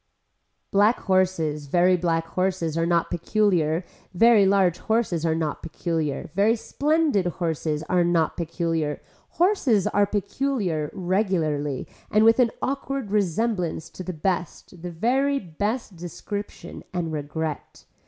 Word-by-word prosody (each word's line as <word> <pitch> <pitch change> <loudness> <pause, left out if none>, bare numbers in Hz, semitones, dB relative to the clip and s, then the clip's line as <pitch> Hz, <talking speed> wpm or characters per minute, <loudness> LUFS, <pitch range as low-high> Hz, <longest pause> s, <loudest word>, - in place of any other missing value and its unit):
Black 205 +4 +4
horses, 170 -6 0
very 180 +5 +4
black 165 -2 0
horses 185 -4 -1
are 165 0 +1
not 170 -1 +1
peculiar, 175 -3 +1 0.3
very 220 -1 +6
large 190 -3 +3
horses 210 -8 0
are 160 - +1
not 160 -2 -2
peculiar, 160 -3 -3
very 205 +4 +3
splendid 290 - +1
horses 160 -3 -2
are 180 +2 +2
not 170 -2 +1
peculiar, 165 -3 -2 0.4
horses 295 - +3
are 205 0 +2
peculiar 205 - -1
regularly 175 -7 -1 0.2
and 215 +1 +4
with 225 +2 +5
an 245 -2 +5
awake 275 -4 -3
resemblance 200 -4 -1
to - - -9
the 185 - -4
best 175 0 -3
the 175 - -5
very 260 +11 +1
best 205 - -3
description 200 +4 -7
and 170 -3 -3
regret. 155 +1 -5
180 Hz, 125 wpm, -24 LUFS, 165-210 Hz, 0.4 s, very